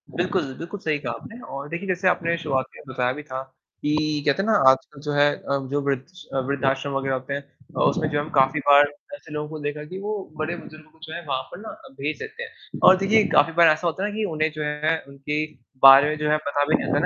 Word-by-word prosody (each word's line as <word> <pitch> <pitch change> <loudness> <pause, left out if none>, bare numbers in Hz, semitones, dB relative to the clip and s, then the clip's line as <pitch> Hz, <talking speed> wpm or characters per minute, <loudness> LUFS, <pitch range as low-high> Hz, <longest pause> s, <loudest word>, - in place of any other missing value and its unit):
बिल्कुल, 175 -6 -1
बिल्कुल 170 +5 -7
सही 155 -4 -1
कहा 125 -5 -4
आपने 230 - -10
और 140 +1 -5
देखिए 170 +5 -5
जैसे 185 0 0
आपने 170 -2 +1
शुरुआत 135 -6 -1
में - - -12
बताया 125 -1 0
भी 150 +2 -8
था, 130 -3 -5 0.4
कि 150 0 0
कहते 145 +5 +2
हैं 210 - -1
ना 220 - +4
आजकल 135 +2 0
जो 150 0 -3
है 145 0 +4
अ, 140 - -2
जो 145 0 0
वृद्ध 140 -2 -1
स 185 +2 -16 0.2
वृद्धाश्रम 135 0 0
वगैरह 135 0 -1
होते 130 +2 -5
हैं 140 - -3
अ, 140 -1 -12
उसमें 160 -4 +2
जो 145 - -1
है 145 - 0
हम 155 - -9
काफ़ी 135 +1 +3
बार 145 0 +9 0.3
ऐसे 160 - -13
लोगों 150 0 -3
को 155 0 -7
देखा 145 0 -4
कि 190 - -5
वो 210 +1 -3 0.2
बड़े 155 +3 -2
बुजुर्गों 155 -1 -13
को 160 - -27
जो 160 0 -8
है 170 - -5
वहाँ 130 -2 -1
पर 175 - -9
ना 220 - -8 0.3
भेज 150 +3 -3
देते 445 +2 -7
हैं। 460 -1 -11
और 185 - +7
देखिए, 210 +3 +3
काफ़ी 165 - +4
बार 170 0 +6
ऐसा 155 +2 +3
होता 170 +4 -2
है 205 - 0
ना 210 - -7
कि 220 - -1
उन्हें 155 0 0
जो 155 - -3
है 150 +2 0
उनके 145 +2 -3 0.4
बारे 135 +2 +9
में 155 - -2
जो 150 0 -1
है 155 - +4
पता 145 0 +1
भी 155 - +3
नहीं - - -1
रहता 145 - +2
150 Hz, 260 wpm, -24 LUFS, 140-170 Hz, 0.4 s, बार